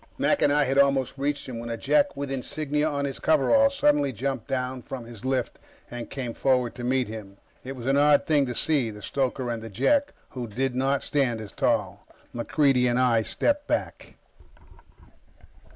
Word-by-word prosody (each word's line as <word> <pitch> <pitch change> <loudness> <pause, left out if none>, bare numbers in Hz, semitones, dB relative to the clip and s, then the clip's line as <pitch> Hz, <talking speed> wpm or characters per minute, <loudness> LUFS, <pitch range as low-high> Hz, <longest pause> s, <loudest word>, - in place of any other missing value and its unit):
Mac 290 - +1
and 145 - +4
I 145 0 +3
had 135 0 +1
almost 140 -2 +3
reached 140 +1 -2
him 120 -3 -6
when 120 0 -6
a 115 - -3
Jek 290 - +2
with 140 -1 -4
insignia 150 +3 -1
on 140 -1 -2
his 135 -1 -4
coveralls 275 - +3
suddenly 145 -2 +3
jumped 130 +1 -3
down 130 -1 -2
from 125 -1 -7
his 115 -1 -11
lift 130 -2 -1 0.3
and 120 -1 -6
came 125 -4 -5
forward 125 -2 +1
to 125 - -8
meet 130 0 +1
him. 105 -3 -9 0.3
It 135 +1 -6
was 120 -2 -8
an 135 +1 +2
odd 145 0 +4
thing 145 -4 +2
to 125 - -4
see 140 -6 +1
the 105 -1 -10
stoker, 130 -2 -2
and 115 -1 -4
the 115 - -8
Jek, 275 - +1 0.2
who 125 -2 -6
did 125 +4 -2
not 135 +2 0
stand 130 -6 0
as 110 -2 -8
tall. - - -1 0.3
MacReidie 125 +1 +2
and 120 - +1
I 120 -3 +3
stepped 290 - 0
back. - - -3
130 Hz, 190 wpm, -26 LUFS, 120-145 Hz, 0.3 s, and